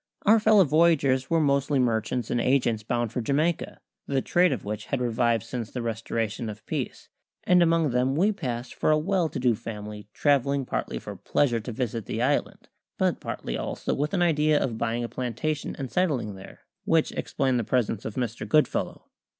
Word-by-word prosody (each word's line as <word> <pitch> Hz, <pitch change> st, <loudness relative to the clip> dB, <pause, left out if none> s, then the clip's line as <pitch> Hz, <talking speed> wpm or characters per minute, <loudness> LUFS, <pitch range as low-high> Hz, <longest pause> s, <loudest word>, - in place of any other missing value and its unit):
Our 220 Hz, +2 st, +6 dB
fellow 215 Hz, -2 st, +6 dB
voyagers 145 Hz, -5 st, +3 dB
were 165 Hz, -, +3 dB
mostly 140 Hz, -1 st, +2 dB
merchants 120 Hz, -1 st, 0 dB
and 120 Hz, -, +1 dB
agents 120 Hz, -4 st, +2 dB
bound 120 Hz, +1 st, -1 dB
for 125 Hz, -, -1 dB
Jamaica, 150 Hz, +7 st, 0 dB, 0.3 s
the 135 Hz, -1 st, +1 dB
trade 180 Hz, 0 st, +3 dB
of 125 Hz, -8 st, -3 dB
which 105 Hz, 0 st, -4 dB
had 140 Hz, -, -2 dB
revived 120 Hz, -2 st, +1 dB
since 120 Hz, -4 st, -5 dB
the 125 Hz, -, -5 dB
restoration 115 Hz, 0 st, -3 dB
of 105 Hz, +1 st, -9 dB
peace; -, -, -4 dB, 0.3 s
and 180 Hz, -1 st, +4 dB
among 165 Hz, -4 st, +3 dB
them 125 Hz, +2 st, +1 dB
we 195 Hz, +7 st, +3 dB
passed 125 Hz, -, -4 dB
for -, -, 0 dB
a 155 Hz, -, +5 dB
well 175 Hz, +1 st, +1 dB
to -, -, -6 dB
do 125 Hz, -2 st, +3 dB
family 105 Hz, -1 st, -7 dB
travelling 140 Hz, +1 st, +1 dB
partly -, -, -3 dB
for -, -, -7 dB
pleasure 125 Hz, -5 st, +1 dB
to 115 Hz, +3 st, -6 dB
visit 115 Hz, -2 st, -3 dB
the 110 Hz, -, -3 dB
island, 135 Hz, +4 st, -1 dB, 0.3 s
but -, -, +1 dB
partly -, -, -5 dB
also -, -, -3 dB
with 150 Hz, +7 st, -1 dB
an 175 Hz, -, +2 dB
idea 155 Hz, -2 st, +3 dB
of 115 Hz, -4 st, -2 dB
buying 115 Hz, +1 st, -1 dB
a -, -, -2 dB
plantation 130 Hz, +6 st, -3 dB
and 135 Hz, -3 st, -6 dB
settling 145 Hz, -, 0 dB
there 95 Hz, 0 st, -12 dB, 0.2 s
which 165 Hz, -1 st, +2 dB
explained 130 Hz, -3 st, -1 dB
the -, -, -1 dB
presence 115 Hz, -3 st, 0 dB
of 110 Hz, -, -6 dB
Mr. 120 Hz, -3 st, -3 dB
Goodfellow. 155 Hz, -1 st, +1 dB
130 Hz, 190 wpm, -26 LUFS, 115-155 Hz, 0.3 s, Our